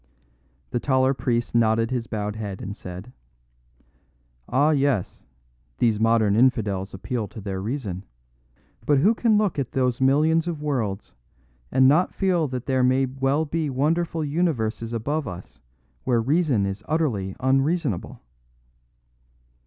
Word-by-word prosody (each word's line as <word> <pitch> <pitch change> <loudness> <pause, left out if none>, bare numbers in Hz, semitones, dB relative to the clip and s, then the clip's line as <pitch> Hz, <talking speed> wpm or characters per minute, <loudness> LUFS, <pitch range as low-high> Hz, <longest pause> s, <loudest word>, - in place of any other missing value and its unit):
The 120 - 0
taller 130 0 +2
priest 120 -3 -1
nodded 115 0 +2
his 120 -2 -2
bowed 105 -1 -3
head 105 -3 -5
and 100 +1 -6
said: 90 +5 -9 1.4
"Ah, 145 +4 +3
yes, 140 - 0 0.5
these 115 -4 +2
modern 110 -2 +3
infidels 105 -6 +1
appeal 110 +4 -3
to 110 - -10
their 95 -2 -4
reason; 105 -5 -4 0.8
but 145 - +4
who 200 +12 +4
can 225 -2 +2
look 205 -8 0
at 130 - -3
those 125 -1 0
millions 155 +5 +3
of 165 -3 -3
worlds 110 -9 -2 0.6
and 130 0 +5
not 155 +7 +3
feel 180 -5 +1
that 125 -2 -5
there 130 -2 +1
may 130 +1 +3
well 135 +4 0
be 160 0 -2
wonderful 160 +4 0
universes 120 -8 -1
above 145 +7 -2
us 90 0 -9 0.4
where 125 -3 +2
reason 135 - +1
is 100 +1 -4
utterly 120 -13 -1
unreasonable?" 135 - 0
130 Hz, 135 wpm, -24 LUFS, 110-150 Hz, 1.4 s, and